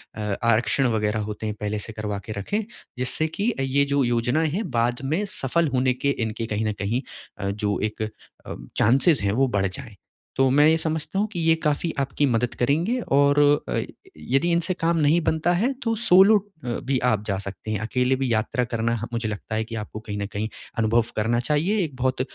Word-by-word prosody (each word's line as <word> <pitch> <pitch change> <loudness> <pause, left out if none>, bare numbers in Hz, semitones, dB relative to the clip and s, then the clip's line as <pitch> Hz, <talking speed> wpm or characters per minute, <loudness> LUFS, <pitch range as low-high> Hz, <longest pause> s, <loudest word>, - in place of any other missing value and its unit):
अ, 110 - -5 0.2
आरक्षण 115 +3 +3
वगैरह 105 0 0
होते 105 +1 -6
हैं, 105 -1 -2
पहले 105 0 -2
से 110 +1 -7
करवा 105 -2 -4
के 110 - -6
रखें, 205 - -1 0.4
जिससे 130 +5 0
कि 225 +4 +1
ये 140 +1 +2
जो 140 0 +1
योजनाएँ 120 +6 +1
हैं, 190 +1 -2
बाद 120 +1 0
में 160 +9 0
सफल 160 +5 +1
होने 130 0 +2
के 140 +3 -1 0.2
इनके, 110 +1 -4
कहीं 110 +1 -1
न 110 - 0
कहीं 110 +5 -1 0.4
अ, 100 -1 -2
जो 105 0 -1
एक 110 - -12 0.4
अ, - - -6 0.2
चांसेज़ 130 - +4
हैं, 100 - +2
वो 135 +3 +3
बढ़ 100 -5 0
जाएँ। 110 +2 -8 0.4
तो 135 -1 +4
मैं 145 +3 +5
ये 160 - +4
समझता 160 +4 -2
हूँ 210 - +1
कि 200 -5 -6
ये 165 0 +4
काफ़ी 150 +2 0
आपकी 140 +1 0
मदद 125 -2 +1
करेंगे 165 - +1
और 140 +1 +4 0.3
अ, - - 0 0.4
यदि 135 +7 0
इनसे 170 +2 +1
काम 165 0 +2
नहीं 155 +3 +3
बनता 160 +2 +1
है, 225 +10 +1
तो 225 -1 0
सोलो 205 0 +6 0.3
अ, - - -5
भी 130 +2 -1
आप 110 -4 +2
जा 100 -2 0
सकते 100 +2 -6
हैं। 105 - -1
अकेले 125 +3 +1
भी 130 -2 -1
यात्रा 110 +3 0
करना, 115 0 -1
ह - - -3
मुझे 115 -2 -1
लगता 105 +1 -5
है 110 - 0
कि 115 +1 -7
आपको 110 0 -6
कहीं 105 -2 -6
न 100 - -2
कहीं 105 +2 -2 0.3
अनुभव 115 +1 +3
करना 115 +2 +1
चाहिए, 150 - +1
एक 145 -5 -5
बहुत 130 0 0
125 Hz, 210 wpm, -24 LUFS, 110-155 Hz, 0.4 s, सोलो